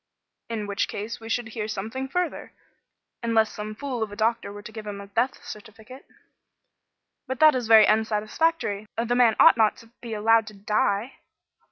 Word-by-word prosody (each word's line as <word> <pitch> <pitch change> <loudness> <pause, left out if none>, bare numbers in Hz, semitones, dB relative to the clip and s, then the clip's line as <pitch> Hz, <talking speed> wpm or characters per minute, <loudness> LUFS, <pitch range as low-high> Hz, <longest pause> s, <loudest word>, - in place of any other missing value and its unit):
"In 220 -2 -3
which 200 -1 -1
case 210 +3 -6
we 225 0 -10
should 230 0 -2
hear 215 -1 -4
something 220 +6 -4
further, 355 +4 -3 0.7
unless 225 -2 +2
some 215 0 -6
fool 260 -1 -4
of 220 -2 -2
a - - -8
doctor 220 -1 -1
were 205 0 -10
to - - -10
give 220 -1 -9
a 200 -1 -6
death 235 +8 -2
certificate." 225 +1 -12 1.2
"But 260 -1 -4
that 310 -1 +7
is 245 -3 -2
very 220 -1 +8
unsatisfactory. 215 +2 0
The 235 +1 0
man 240 -3 +4
ought - - +7
not 220 -2 +3
to 230 0 -17
be 230 -2 -5
allowed 225 +1 +3
to 215 - -10
die." 205 +3 -1
220 Hz, 175 wpm, -25 LUFS, 210-240 Hz, 1.2 s, very